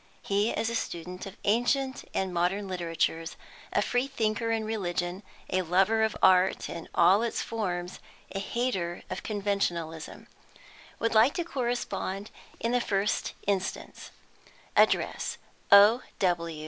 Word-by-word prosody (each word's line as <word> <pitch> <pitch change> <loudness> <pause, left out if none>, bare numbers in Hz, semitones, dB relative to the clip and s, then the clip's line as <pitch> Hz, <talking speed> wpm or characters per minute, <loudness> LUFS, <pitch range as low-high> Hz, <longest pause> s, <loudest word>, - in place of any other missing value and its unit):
He 205 +2 +1
is 225 - -1
a - - -2
student 180 -3 -4
of 195 - -10
ancient 260 +5 +1
and 190 -1 -2
modern 180 +4 0
literatures, 165 -2 -2 0.4
a - - +2
free 245 +2 0
thinker 230 -3 -1
in 225 -1 0
religion, 180 -3 -2 0.3
a 185 - +2
lover 190 +6 +2
of 220 -1 +1
art 185 0 +4
in 170 -1 -7
all 195 +4 +5
its 235 -1 -1
forms, 180 -5 -3 0.3
a 195 - -3
hater 195 -5 -2
of 185 - -3
conventionalism. 185 -6 -2 0.7
Would 230 - 0
like 225 +5 +5
to 345 - 0
correspond 240 - -3 0.3
in 230 - -1
the 245 0 +2
first 200 -2 -1
instance. 195 -2 -3 0.7
Address - - +2 0.3
O. 205 +5 +8
200 Hz, 130 wpm, -28 LUFS, 180-225 Hz, 0.7 s, O